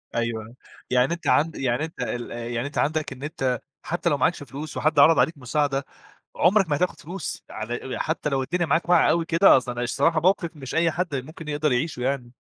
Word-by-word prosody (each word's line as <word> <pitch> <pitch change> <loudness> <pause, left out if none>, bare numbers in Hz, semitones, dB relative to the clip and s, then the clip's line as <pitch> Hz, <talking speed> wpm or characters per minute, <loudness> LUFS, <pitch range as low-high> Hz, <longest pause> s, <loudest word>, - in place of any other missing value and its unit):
أيوه، 115 -1 -3 0.3
يعني 125 +5 +3
أنت 170 - -6
عند 160 +2 +3
يعني 130 +2 0
أنت 160 - -13
ال 120 -1 -4
يعني 120 +2 -3
أنت 145 - -8
عندك 155 -1 0
إن 135 +2 -12
أنت 130 -5 -1 0.2
حتّى 175 +1 -1
لو 145 - +1
معاكش 150 +3 +1
فلوس 145 +3 -7
وحد 155 -1 +2
عَرَض 160 +3 +7
عليك 160 -2 +2
مساعدة، 140 +1 -1 0.5
عمرك 190 0 +3
ما 145 - +2
هتاخُد 165 0 -1
فلوس 175 +1 -6
على 120 +4 -5
حتّى 160 -1 -1
لو 135 -1 0
الدنيا 175 +5 -1
معاك 165 +1 0
واقعة 175 -2 +5
أوي 165 +1 +2
كده، 170 +1 +6
أصل 125 -1 -3
الصراحة 140 +7 +1
موقف 180 -1 +2
مش 135 -2 -7
أي 165 0 +3
حد 170 -2 -2
ممكن 155 +4 -7
يقدر 150 0 0
يعيشه 125 +1 -1
يعني. 125 -2 -2
145 Hz, 200 wpm, -24 LUFS, 125-165 Hz, 0.5 s, عَرَض